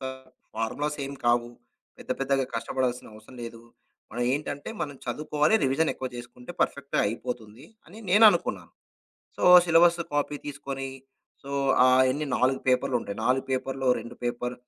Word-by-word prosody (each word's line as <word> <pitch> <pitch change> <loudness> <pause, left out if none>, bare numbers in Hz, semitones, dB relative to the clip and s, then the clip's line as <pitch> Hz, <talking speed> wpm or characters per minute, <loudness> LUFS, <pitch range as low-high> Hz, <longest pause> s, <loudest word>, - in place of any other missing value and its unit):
ఫ - - -15 0.5
ఫార్ములాస్ 145 +7 -2
ఏం 140 - -7
కావు. 120 0 +2 0.5
పెద్ద - - -12
పెద్దగా 135 0 +1
కష్టపడాల్సిన 125 -1 -2
అవసరం 110 +4 -15
లేదు. 115 0 -8 0.5
మనం 120 - -2
ఏంటంటే 145 0 -4
మనం 145 -2 -5
చదువుకోవాలి, 150 - +1
రివిజన్ 135 +4 +2
ఎక్కువ 130 - -5
చేసుకుంటే 125 +4 -9
పర్ఫెక్ట్‌గా 140 0 0
అయిపోతుంది, 115 +1 -6 0.2
అని 205 +6 -13
నేనునుకున్నాను. 210 +3 +4 0.6
సో, - - -6 0.2
సిలబస్ 170 0 +5
కాపీ 145 0 -1
తీసుకొని, 135 -2 -5 0.5
సో, 140 - -9 0.6
ఎన్నీ 150 +3 -2
4 130 +2 +1
పేపర్‌లుంటాయి. 125 -5 0
4 130 +1 +2
పేపర్‌లో‌ 130 0 -1
2 120 - -10
పేపర్. 125 +1 -2
135 Hz, 130 wpm, -26 LUFS, 120-145 Hz, 0.6 s, సిలబస్